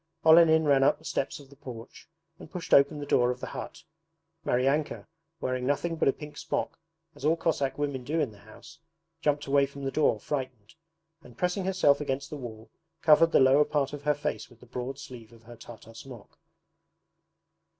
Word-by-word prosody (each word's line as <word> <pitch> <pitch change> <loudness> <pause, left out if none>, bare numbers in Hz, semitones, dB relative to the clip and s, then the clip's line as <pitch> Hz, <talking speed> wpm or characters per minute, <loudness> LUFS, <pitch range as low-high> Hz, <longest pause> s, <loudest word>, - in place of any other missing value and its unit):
Olenin 160 -1 +6
ran 140 -2 +4
up 145 +2 +3
the 160 - -20
steps 135 - -3
of 140 -1 -16
the - - -15
porch 125 0 -11 0.3
and - - -12
pushed 180 -1 -5
open 140 +2 +5
the 145 - -5
door 125 -3 +3
of 125 - -3
the - - -5
hut. - - -8 0.6
Maryanka, 135 +5 0 0.3
wearing 130 -2 -2
nothing 165 +4 0
but 160 - 0
a - - +6
pink 150 +1 -11
smock, - - -3 0.3
as - - -15
all 160 +3 +3
Cossack 145 -5 -1
women 140 -3 -2
do 155 +6 -1
in 145 -7 0
the 100 - -17
house, 110 +9 -15 0.4
jumped 145 -1 0
away 140 0 +3
from 140 0 -10
the 135 - -2
door, 145 -8 +2
frightened, 130 -5 -5 0.5
and 125 -6 -16
pressing 180 +1 -1
herself 165 -7 +3
against 135 -1 -3
the - - -4
wall 115 -4 -9 0.3
covered 160 +1 +6
the - - +5
lower 135 +2 +6
part 145 -2 -1
of 145 - -6
her 150 0 +1
face 150 +1 -4
with 120 -2 -20
the - - -16
broad 125 +2 -5
sleeve 125 -5 -11
of 115 -1 -18
her 120 +1 -12
Tartar 115 -1 -13
smock. 115 -2 -12
140 Hz, 195 wpm, -28 LUFS, 125-150 Hz, 0.6 s, Olenin